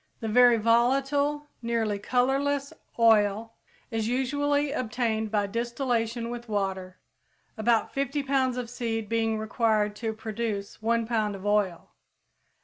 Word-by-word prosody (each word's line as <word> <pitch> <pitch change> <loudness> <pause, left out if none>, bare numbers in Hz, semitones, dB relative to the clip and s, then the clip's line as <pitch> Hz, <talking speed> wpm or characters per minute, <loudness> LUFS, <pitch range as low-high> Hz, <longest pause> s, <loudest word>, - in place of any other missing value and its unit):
The 225 - -4
very 245 +1 +6
volatile, 275 +6 +2 0.2
nearly 225 -3 -1
colorless 275 +5 0 0.2
oil 225 -1 +3 0.4
is 225 -1 -1
usually 285 +3 0
obtained 225 -4 -1
by 205 -1 +1
distillation 235 +1 -2
with 240 -1 -7
water, 190 -3 -2 0.6
about 230 0 +1
50 275 +1 -1
pounds 260 -2 +1
of 250 -1 -3
seed 225 -2 -3
being 225 0 0
required 215 -1 0
to 225 0 -2
produce 220 -2 -4
one 230 +1 +1
pound 215 -3 -1
of 195 +1 -9
oil. 205 -4 0
230 Hz, 125 wpm, -27 LUFS, 215-250 Hz, 0.6 s, very